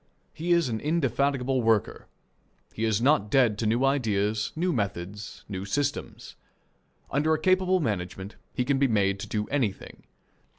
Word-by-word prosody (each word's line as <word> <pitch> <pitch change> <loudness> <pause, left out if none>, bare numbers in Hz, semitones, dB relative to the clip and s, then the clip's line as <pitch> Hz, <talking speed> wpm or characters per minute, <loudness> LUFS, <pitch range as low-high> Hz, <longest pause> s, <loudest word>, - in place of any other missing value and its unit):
He 170 +3 -3
is 170 -3 +4
an 110 -2 -2
indefatigable 140 -3 0
worker. 115 -2 +1 0.7
He 110 - -2
is 110 0 +1
not 130 -7 +3
dead 115 -4 +3
to 115 - 0
new 120 +5 +2
ideas, 110 -6 0
new 175 +2 0
methods, 100 -2 -4
new 95 -2 -5
systems. 145 +8 -3 0.8
Under 155 +3 +2
a - - -4
capable 185 +1 +3
management 100 - -3 0.2
he 125 - -1
can 135 0 +1
be 140 - +4
made 100 -4 +1
to - - -6
do 105 -1 -2
anything. 120 -9 -3
120 Hz, 155 wpm, -27 LUFS, 105-145 Hz, 0.8 s, is